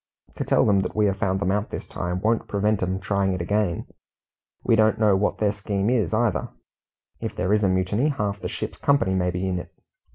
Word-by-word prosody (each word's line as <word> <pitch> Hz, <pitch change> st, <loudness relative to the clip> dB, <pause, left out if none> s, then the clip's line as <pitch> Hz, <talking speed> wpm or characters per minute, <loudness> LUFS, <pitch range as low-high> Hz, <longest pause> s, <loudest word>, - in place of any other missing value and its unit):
To -, -, -1 dB
tell -, -, +3 dB
them 100 Hz, -2 st, +4 dB
that 95 Hz, -, -3 dB
we 105 Hz, 0 st, +3 dB
have 100 Hz, -1 st, +1 dB
found 95 Hz, 0 st, 0 dB
them 95 Hz, -1 st, 0 dB
out 105 Hz, +1 st, -1 dB
this -, -, -6 dB
time 90 Hz, +1 st, -4 dB
won't 110 Hz, +2 st, +1 dB
prevent 105 Hz, +1 st, 0 dB
'em 95 Hz, +1 st, -1 dB
trying 95 Hz, 0 st, 0 dB
it 90 Hz, -, -3 dB
again. 100 Hz, 0 st, 0 dB, 0.8 s
We 115 Hz, -, +3 dB
don't 110 Hz, 0 st, +3 dB
know 105 Hz, -3 st, +4 dB
what 100 Hz, +2 st, 0 dB
their 105 Hz, -2 st, +2 dB
scheme 100 Hz, +1 st, -1 dB
is 120 Hz, -4 st, +1 dB
either. 110 Hz, -3 st, 0 dB, 0.7 s
If -, -, -5 dB
it 90 Hz, -, 0 dB
is 105 Hz, 0 st, +3 dB
a 100 Hz, -, +3 dB
mutiny, 95 Hz, +9 st, +1 dB
half 105 Hz, -8 st, -2 dB
the -, -, -3 dB
ship's -, -, -5 dB
company 140 Hz, -10 st, +2 dB
may 90 Hz, -1 st, +1 dB
be 90 Hz, +1 st, -2 dB
in 90 Hz, -1 st, -1 dB
it. -, -, -9 dB
100 Hz, 225 wpm, -24 LUFS, 95-105 Hz, 0.8 s, them